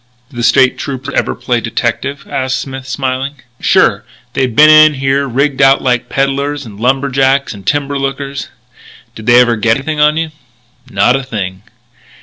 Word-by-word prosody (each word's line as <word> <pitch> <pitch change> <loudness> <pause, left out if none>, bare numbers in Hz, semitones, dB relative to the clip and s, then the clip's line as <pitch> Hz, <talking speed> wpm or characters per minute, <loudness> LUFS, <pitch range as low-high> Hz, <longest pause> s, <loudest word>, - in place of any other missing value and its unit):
"Do 125 - -13
the - - -2
State 130 +2 +3
Troopers 135 0 -5
ever - - -1
play 120 -2 -1
detective?" 125 +4 -3
asked 130 0 -2
Smith, 135 -1 -7
smiling. 135 +1 -3 0.2
"Sure. - - +2 0.3
They've 130 -4 -1
been 150 +4 +7
in 155 -1 +6
here 135 +1 0
rigged 135 +2 0
out 135 0 +4
like 125 -1 0
peddlers 140 +1 -1
and 105 -3 -11
lumber 135 +4 +1
jacks 135 +1 +1
and 100 -2 -13
timber 140 +1 -1
lookers." 135 0 -4 0.7
"Did 110 +1 -11
they 120 0 +6
ever 120 -2 +3
get 115 +1 +2
anything 150 +2 -4
on 150 +1 +3
you?" 160 -1 -2 0.6
"Not 125 - +2
a 135 - -1
thing." 100 -7 -5
135 Hz, 170 wpm, -13 LUFS, 125-140 Hz, 0.7 s, been